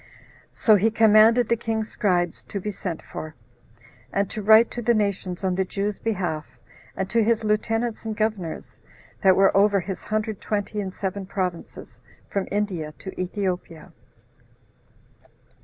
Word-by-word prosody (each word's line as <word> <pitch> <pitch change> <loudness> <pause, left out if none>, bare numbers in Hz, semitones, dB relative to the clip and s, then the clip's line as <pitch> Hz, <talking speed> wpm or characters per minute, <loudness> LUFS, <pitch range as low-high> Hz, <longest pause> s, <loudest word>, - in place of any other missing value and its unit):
So 215 -2 +4
he 215 +4 +3
commanded 220 +1 +5
the 235 - +3
king's 220 -1 -3
scribes 175 -4 0
to 200 - -5
be 210 +2 -4
sent 180 -4 -5
for, 155 0 -8 0.8
and 200 -1 -1
to 215 - -4
write 220 +3 +6
to 240 - -5
the 235 +1 +2
nations, 200 -3 -2
on 185 -1 +1
the 190 +1 +1
Jews' 200 +2 -3
behalf, 175 -8 -3 0.4
and 190 - -1
to 230 -1 +3
his 225 0 +1
lieutenants 225 +2 0
and 220 -1 -4
governors, 215 -7 -3 0.4
that 190 -2 +5
were 195 0 +4
over 200 0 +4
his 185 +1 -5
hundred 215 -1 -2
twenty 210 0 -2
and 190 -2 -4
seven 195 0 -4
provinces, 185 -3 -5 0.3
from 200 -1 -1
India 185 -7 -2
to 190 -1 -7
Ethiopia. 180 -4 -4
205 Hz, 150 wpm, -24 LUFS, 185-220 Hz, 0.8 s, write